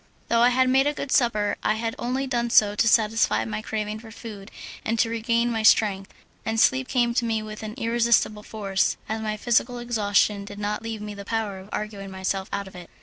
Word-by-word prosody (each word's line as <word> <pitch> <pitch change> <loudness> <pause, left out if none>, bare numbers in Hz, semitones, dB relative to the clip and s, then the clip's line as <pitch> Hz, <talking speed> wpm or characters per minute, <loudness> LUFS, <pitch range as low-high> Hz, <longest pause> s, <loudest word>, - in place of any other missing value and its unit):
Though 230 0 +3
I 240 - +6
had 255 +1 +3
made 265 +2 +4
a 295 - 0
good 280 - -5
supper 215 -4 +2
I 215 - +1
had 225 +1 -2
only 255 +3 -1
done 240 -2 -1
so 210 -3 +5
to 220 +2 +1
satisfy 215 - +3
my 110 -1 -4
craving 215 - -4
for 225 0 -12
food 215 -3 -9 0.3
and 230 +1 -1
to 225 0 +2
regain 230 +1 +1
my 225 -1 -1
strength, 205 -2 +3 0.3
and 225 0 -1
sleep 260 +2 +3
came 240 -2 +1
to 240 - +1
me 225 -2 -1
with 215 0 -8
an 215 0 -6
irresistible 230 -2 +1
force, 195 -3 -1
as 220 +1 -3
my 215 -1 -2
physical 240 +2 +1
exhaustion 210 -3 +1
did 205 0 -10
not 210 +1 -2
leave 225 -2 -5
me 210 0 -6
the 200 0 -8
power 210 -2 -3
of 190 +2 -13
arguing 205 -2 -5
myself 190 0 -3
out 200 -1 -3
of 190 - -13
it. 175 -1 -10
220 Hz, 220 wpm, -25 LUFS, 205-235 Hz, 0.3 s, I